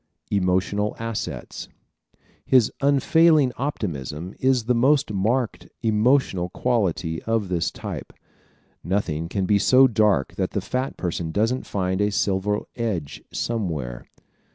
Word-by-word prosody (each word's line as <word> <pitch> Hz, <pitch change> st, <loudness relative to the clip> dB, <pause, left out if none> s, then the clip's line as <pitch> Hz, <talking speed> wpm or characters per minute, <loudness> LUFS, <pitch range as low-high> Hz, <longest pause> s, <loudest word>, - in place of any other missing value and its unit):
Emotional 100 Hz, +2 st, +1 dB
Assets 115 Hz, -1 st, -5 dB, 0.5 s
¶ -, -, -44 dB, 0.3 s
His 125 Hz, -4 st, +4 dB
unfailing 145 Hz, +1 st, +4 dB
optimism 85 Hz, -, -4 dB
is 130 Hz, -2 st, +2 dB
the 125 Hz, +3 st, +1 dB
most 135 Hz, 0 st, +2 dB
marked 115 Hz, +5 st, -1 dB, 0.2 s
emotional 110 Hz, -4 st, +2 dB
quality 90 Hz, -8 st, -1 dB
of 115 Hz, -4 st, 0 dB
this 85 Hz, -2 st, 0 dB
type. -, -, -7 dB, 0.7 s
Nothing 85 Hz, -3 st, -1 dB
can 95 Hz, 0 st, -1 dB
be 100 Hz, +2 st, +3 dB
so 130 Hz, +5 st, +6 dB
dark 105 Hz, -, +2 dB
that -, -, -1 dB
the -, -, 0 dB
fat 130 Hz, +1 st, -3 dB
person 85 Hz, -2 st, -3 dB
doesn't 115 Hz, +7 st, 0 dB
find 95 Hz, 0 st, -1 dB
a 105 Hz, -, +2 dB
silver 100 Hz, +1 st, 0 dB
edge 100 Hz, -11 st, -3 dB
somewhere. 80 Hz, -, -3 dB
105 Hz, 125 wpm, -23 LUFS, 90-125 Hz, 0.7 s, so